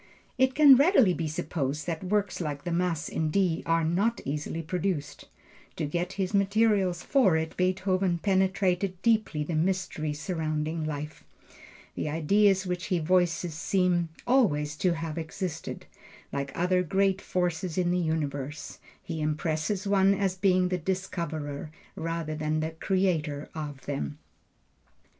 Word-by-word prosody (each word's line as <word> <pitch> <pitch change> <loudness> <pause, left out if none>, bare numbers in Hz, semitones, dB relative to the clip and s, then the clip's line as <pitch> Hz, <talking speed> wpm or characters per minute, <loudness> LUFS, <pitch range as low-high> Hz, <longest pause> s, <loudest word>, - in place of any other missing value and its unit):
It 260 0 +3
can 285 -3 +8
readily 275 - +5
be 165 -2 -2
supposed 150 -1 -3
that 165 0 -3
works 200 -1 0
like 145 -3 -4
the 175 - -3
Mass 170 -2 0
in 160 -1 -1
D 175 -1 +1
are 165 0 +2
not 195 +9 +1
easily 150 +3 -3
produced. 160 -4 -3 0.5
To 160 - -2
get 175 +5 -2
his 190 0 -2
materials 200 -3 +2
for 210 - +3
it 160 0 -3
Beethoven 185 0 +1
penetrated 190 0 +1
deeply 215 -10 +2
the 165 - -4
mystery 165 -2 -1
surrounding 155 0 -2
life. 150 0 -5 0.7
The - - -3
ideas 190 +5 +3
which 180 0 -3
he 185 - +1
voices 175 0 +1
seem 175 +1 +1 0.2
always 150 - +2
to 180 +2 +2
have 165 -1 -4
existed, 160 0 -5 0.5
like 140 -1 -2
other 180 +1 +2
great 195 +2 +1
forces 180 -1 -2
in 175 -1 +2
the 180 - +1
universe; 150 -3 -3 0.2
he 160 - -4
impresses 155 +6 -1
one 195 0 +4
as 195 -2 0
being 185 -1 +2
the 180 -1 -1
discoverer, 160 -5 -3 0.3
rather 165 -1 -3
than 155 0 -1
the 160 +1 -2
creator 160 -4 -1
of 145 -3 -6
them. 145 +1 -3
175 Hz, 140 wpm, -28 LUFS, 155-190 Hz, 0.7 s, can